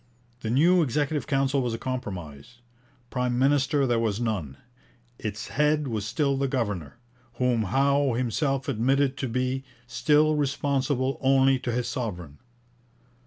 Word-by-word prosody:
The 110 Hz, -, -4 dB
new 170 Hz, +9 st, +4 dB
Executive 145 Hz, +1 st, -1 dB
Council 135 Hz, -1 st, +1 dB
was 120 Hz, -2 st, -1 dB
a -, -, -5 dB
compromise. 95 Hz, -, -6 dB, 0.6 s
Prime 125 Hz, -1 st, -1 dB
minister 140 Hz, +1 st, +2 dB
there 120 Hz, -2 st, +1 dB
was 110 Hz, -2 st, -1 dB
none. 95 Hz, -, -3 dB, 0.6 s
Its 105 Hz, 0 st, -5 dB
head 150 Hz, 0 st, +1 dB
was 110 Hz, -4 st, -3 dB
still 140 Hz, +2 st, 0 dB
the 140 Hz, 0 st, 0 dB
governor, 105 Hz, -, -3 dB, 0.4 s
whom 125 Hz, -3 st, +1 dB
Howe 140 Hz, +5 st, +2 dB
himself 130 Hz, +3 st, -1 dB
admitted 135 Hz, +2 st, +1 dB
to 130 Hz, -, -3 dB
be 130 Hz, +2 st, -1 dB, 0.2 s
'still 150 Hz, +5 st, +3 dB
responsible 140 Hz, -2 st, 0 dB
only 135 Hz, 0 st, +4 dB
to 125 Hz, -, -3 dB
his 120 Hz, +1 st, -1 dB
sovereign.' 90 Hz, -, -5 dB
130 Hz, 135 wpm, -26 LUFS, 115-140 Hz, 0.6 s, new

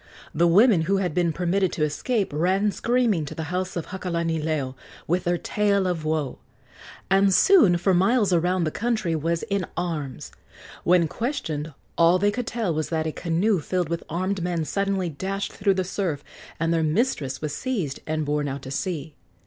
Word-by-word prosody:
The 170 Hz, +3 st, +3 dB
women 200 Hz, +1 st, +5 dB
who 195 Hz, -, +3 dB
had 180 Hz, -4 st, -1 dB
been 175 Hz, -1 st, +2 dB
permitted 180 Hz, +3 st, 0 dB
to 155 Hz, -, -1 dB
escape 195 Hz, -, -1 dB
ran 190 Hz, +7 st, +2 dB
screaming 230 Hz, -7 st, +1 dB
to -, -, -7 dB
the 160 Hz, -, -4 dB
house 185 Hz, +1 st, -2 dB
of 170 Hz, -, -4 dB
Hakalanileo 160 Hz, -6 st, -2 dB, 0.3 s
with 175 Hz, +3 st, 0 dB
their 175 Hz, 0 st, +2 dB
tale 200 Hz, +1 st, +1 dB
of 175 Hz, -4 st, -1 dB
woe, 155 Hz, -4 st, -2 dB, 0.7 s
and 195 Hz, 0 st, +5 dB
soon 210 Hz, -, +6 dB
for 185 Hz, +2 st, +2 dB
miles 195 Hz, +2 st, +3 dB
around 175 Hz, +1 st, +2 dB
the 155 Hz, -, 0 dB
country 220 Hz, -7 st, -1 dB
was 165 Hz, +2 st, -1 dB
in 200 Hz, -1 st, -1 dB
arms. 155 Hz, -7 st, -4 dB, 0.5 s
When 175 Hz, -1 st, +4 dB
questioned, 160 Hz, -, -3 dB, 0.2 s
all 170 Hz, +2 st, +6 dB
they 205 Hz, +2 st, +2 dB
could 245 Hz, +2 st, -4 dB
tell 220 Hz, -8 st, -1 dB
was 155 Hz, 0 st, -2 dB
that 160 Hz, -1 st, -1 dB
a 160 Hz, -, -1 dB
canoe 180 Hz, +5 st, +1 dB
filled 180 Hz, +1 st, -2 dB
with 170 Hz, 0 st, -2 dB
armed 185 Hz, +3 st, -1 dB
men 170 Hz, -2 st, -1 dB
suddenly 195 Hz, 0 st, -1 dB
dashed 195 Hz, +6 st, -4 dB
through 195 Hz, -1 st, +1 dB
the 185 Hz, -, 0 dB
surf, 175 Hz, -6 st, -3 dB, 0.4 s
and 165 Hz, +1 st, +1 dB
their 165 Hz, -, +2 dB
mistress 155 Hz, -, 0 dB
was 150 Hz, -1 st, -4 dB
seized 200 Hz, -, -2 dB
and 155 Hz, -1 st, -1 dB
borne 145 Hz, 0 st, 0 dB
out 140 Hz, 0 st, -5 dB
to 130 Hz, -, -7 dB
sea. 160 Hz, -1 st, -3 dB
175 Hz, 180 wpm, -24 LUFS, 160-195 Hz, 0.7 s, soon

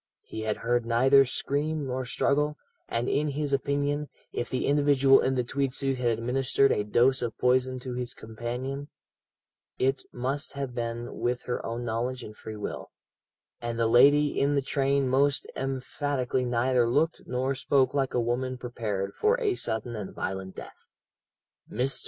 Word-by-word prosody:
He 110 Hz, -, -7 dB
had 110 Hz, -1 st, -1 dB
heard 120 Hz, +1 st, 0 dB
neither 130 Hz, +4 st, +5 dB
scream 145 Hz, +4 st, -1 dB
nor 130 Hz, 0 st, -3 dB
struggle, 150 Hz, +4 st, +1 dB, 0.3 s
and 115 Hz, +2 st, -1 dB
in 150 Hz, +1 st, +1 dB
his 145 Hz, 0 st, -2 dB
opinion, 145 Hz, +2 st, 0 dB, 0.2 s
if 120 Hz, -, -3 dB
the 130 Hz, -, -1 dB
individual 140 Hz, -2 st, +5 dB
in 130 Hz, -, +1 dB
the 125 Hz, -, +1 dB
tweed 135 Hz, +1 st, -1 dB
suit 135 Hz, -2 st, 0 dB
had 125 Hz, -, 0 dB
administered 130 Hz, +3 st, +2 dB
a 105 Hz, -, +1 dB
dose 120 Hz, +6 st, +3 dB
of 120 Hz, -3 st, -3 dB
poison 130 Hz, +1 st, +2 dB
to 125 Hz, 0 st, -5 dB
his 125 Hz, +1 st, -4 dB
companion, 125 Hz, +5 st, -5 dB, 0.9 s
it 135 Hz, +1 st, +1 dB
must 135 Hz, +4 st, -3 dB
have 140 Hz, -3 st, -4 dB
been 120 Hz, 0 st, -4 dB
with 125 Hz, +1 st, -1 dB
her 125 Hz, -, -3 dB
own 120 Hz, +1 st, -4 dB
knowledge 120 Hz, +2 st, -2 dB
and 105 Hz, -, -9 dB
free 110 Hz, 0 st, -8 dB
will; 105 Hz, -, -5 dB, 0.7 s
and 120 Hz, -1 st, -3 dB
the 115 Hz, -, +2 dB
lady 145 Hz, +6 st, +5 dB
in 140 Hz, +1 st, +2 dB
the 140 Hz, -, +1 dB
train 135 Hz, 0 st, +1 dB
most 135 Hz, +2 st, +2 dB
emphatically 135 Hz, -1 st, -2 dB
neither 120 Hz, 0 st, +2 dB
looked 155 Hz, +6 st, +1 dB
nor 130 Hz, +2 st, 0 dB
spoke 135 Hz, 0 st, +2 dB
like 135 Hz, -2 st, 0 dB
a -, -, +3 dB
woman 125 Hz, +2 st, -1 dB
prepared 110 Hz, -6 st, -3 dB
for 455 Hz, +3 st, +2 dB
a 425 Hz, -5 st, +1 dB
sudden 115 Hz, -, -3 dB
and 105 Hz, -3 st, -6 dB
violent 95 Hz, 0 st, -4 dB
death. -, -, -11 dB, 0.8 s
"Mr. 130 Hz, +4 st, 0 dB
130 Hz, 165 wpm, -28 LUFS, 120-140 Hz, 0.9 s, neither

